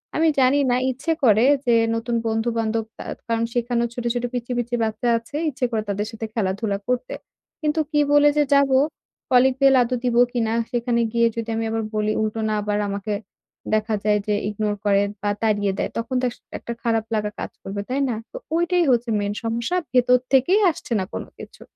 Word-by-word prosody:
আমি 325 +1 +3
জানি 265 +2 +4
না 245 - +3
ইচ্ছে 270 +6 -3
করে, 220 -1 +5 0.2
যে 240 -1 +4 0.2
নতুন 230 +1 -2
বন্ধু-বান্ধব 225 0 -1 0.2
আ - - -17 0.2
কারণ 230 0 0
সেখানেও 235 0 0
ছোট, 245 - -5
ছোট, 245 -1 -2
পিচ্চি, 245 0 -4
পিচ্চি 240 0 -1
বাচ্চা 225 +2 -1
আছে। 230 +6 -7
ইচ্ছে 255 -3 -2
করে 220 -2 -1
তাদের 205 +1 -1
সাথে 225 0 -5
খেলাধুলা 200 -1 -1
করতে। 250 - -1 0.5
কিন্তু 305 0 0
কী 295 - +2
বলে 290 0 +6
যে 295 - +5
যাবো? 280 -1 +4 0.5
কলিং 255 +1 +5
বেল 270 -1 +6
আদৌ 245 +1 0
দিবো 240 -1 +3
কিনা? 225 -2 0 0.2
সেখানে 240 -1 0
গিয়ে 235 0 +4
যদি 230 -1 -4
আমি 225 0 -1
আবার 225 0 -1
বলি, 215 0 +1
উল্টো 215 +1 -2
না - - 0
আবার 205 0 -1
আমাকে 200 +1 -3 0.6
দেখা 215 0 +1
যায় 210 0 +3
যে, 210 - +2 0.2
ইগনোর 210 0 -2
করে 200 -1 +4 0.2
বা 205 - 0
তাড়িয়ে 205 -3 +1
দেয়। - - -1
তখন 230 +3 -3
তো - - 0
আস 240 - -11 0.2
একটা 235 - -5
খারাপ 225 -2 +1
লাগা 210 -1 -1
কাজ - - -5
করবে, 200 +1 -5
তাই 270 +2 0
না? 235 - -1 0.2
তো - - -7 0.2
ওইটাই 345 +1 +2
হচ্ছে 240 -1 +1
মেইন 205 0 -1
সমস্যা। 230 +8 -1 0.2
ভেতর 250 0 +5 0.2
থেকেই 310 - +4
আসছে 275 - -6
না 190 - -1
কোন - - -3 0.2
কিছু। - - -12
235 Hz, 200 wpm, -22 LUFS, 215-250 Hz, 0.6 s, বলে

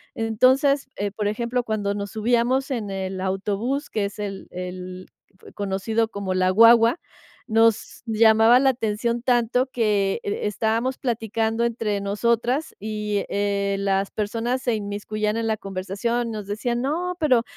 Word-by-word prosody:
Entonces, 260 +5 +3
eh, 205 0 -2
por 210 0 -2
ejemplo, 235 +4 -1
cuando 205 -3 -1
nos 200 0 -5
subíamos 240 +4 +1
en 225 -5 -2
el 190 -1 -4
autobús, 205 +9 -2
que 210 -2 -1
es 200 +1 -7
el 200 -2 -5
el 180 0 -7 0.5
conocido 205 +3 -1
como 200 -3 -3
"la 185 0 +2
guagua", 230 - +6 0.5
nos 225 0 +2
llamaba 225 +1 +5
la 270 - +4
atención 235 -1 -1
tanto 250 0 +2
que, 210 -6 0
eh, 200 - -3
estábamos 225 +5 0
platicando 225 -1 -1
entre 220 -3 -1
nosotras 235 +7 0
y, 210 -1 -2
eh, 200 0 0
las 195 0 0
personas 230 +4 -2
se 240 -3 0
inmiscuyan 210 +1 -3
en 230 0 -1
la 220 -1 0
conversación, 205 +4 -3
nos 210 -2 -5
decían: 235 +4 -2
"No, 345 +6 -2
pero, 255 -7 +3
220 Hz, 145 wpm, -23 LUFS, 200-235 Hz, 0.5 s, guagua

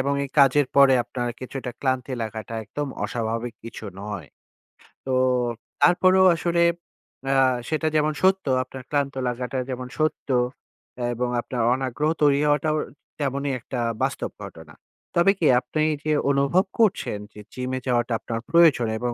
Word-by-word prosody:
এবং 140 +1 0
এই - - -6
কাজের 140 0 +5
পরে 140 -1 +7
আপনার 120 0 -4
কিছুটা 130 0 -5
ক্লান্তি 130 -1 -1
লাগাটা 110 +1 -6
একদম 145 +7 -4 0.2
অস্বাভাবিক 115 0 -3
কিছু 115 -1 -8 0.2
নয়। 100 -6 -6 0.8
তো 130 - -1 0.7
তারপরেও 185 +1 +5
আসলে 170 0 0 0.7
আ - - +3 0.4
সেটা 155 0 0
যেমন 155 0 +2
সত্য, 190 +1 +3 0.2
আপনার 130 0 -10
ক্লান্ত 140 -1 0
লাগাটা 125 +2 -3
যেমন 125 -1 -4
সত্য 155 -2 -1 0.8
এবং 125 +1 -1
আপনার 120 -1 -4
অনাগ্রহ 135 +3 -1
তৈরি 140 -1 +4
হওয়াটাও 155 +1 +2 0.4
তেমনই 140 0 -1
একটা 125 +1 -6 0.2
বাস্তব - - -2
ঘটনা। 80 -2 -11 0.4
তবে 170 +3 +5
কি 160 - +3
আপনি 130 +5 -2 0.2
যে 155 - +1 0.2
অনুভব 140 +7 +2
করছেন 205 - +1
যে - - -12
জিমে 130 0 -3
যাওয়াটা 120 -1 +1
আপনার 115 -1 -4
প্রয়োজন 160 -9 +5
এবং 120 0 -2
135 Hz, 140 wpm, -24 LUFS, 120-155 Hz, 0.8 s, পরে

